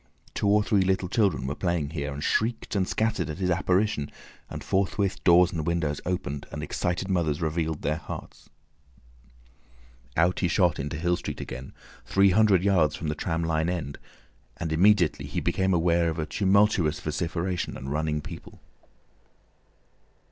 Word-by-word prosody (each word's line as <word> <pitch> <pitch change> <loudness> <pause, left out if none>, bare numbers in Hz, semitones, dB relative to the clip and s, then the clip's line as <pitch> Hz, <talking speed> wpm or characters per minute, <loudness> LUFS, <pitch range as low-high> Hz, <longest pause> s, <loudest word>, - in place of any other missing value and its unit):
Two - - -1
or 105 +1 +4
three 105 -2 +2
little 95 0 +1
children 100 - +1
were 70 - -2
playing 85 -3 -1
here, 75 -2 -3
and 70 +2 -6
shrieked 115 0 0
and 95 -2 +1
scattered 110 -6 -1
at 75 - -5
his 90 -1 0
apparition, 90 -3 +1 0.4
and - - -7
forthwith 95 0 0
doors 90 0 +6
and 80 -1 -3
windows 80 -4 -1
opened 75 -6 -3
and - - -5
excited 90 +2 -2
mothers 85 -6 0
revealed 80 -1 -2
their 75 +2 0
hearts. 80 - -9 1.7
Out 85 +3 +3
he 90 - +2
shot 90 -2 +2
into 75 +3 -3
Hill 85 +2 +1
Street - - -6
again, 65 +1 -7 0.3
three 95 0 +3
hundred 100 -2 +4
yards 85 -7 +3
from 80 - -4
the - - 0
tram 80 +1 -2
line 80 0 0
end, 80 -6 -4 0.6
and 85 -2 -4
immediately 90 +1 +3
he - - -2
became 95 0 0
aware 85 -1 +2
of 80 - -4
a 80 - -1
tumultuous 95 -3 +2
vociferation 85 +3 -3
and 70 +2 -6
running 75 0 -1
people. - - -10
85 Hz, 160 wpm, -26 LUFS, 80-95 Hz, 1.7 s, doors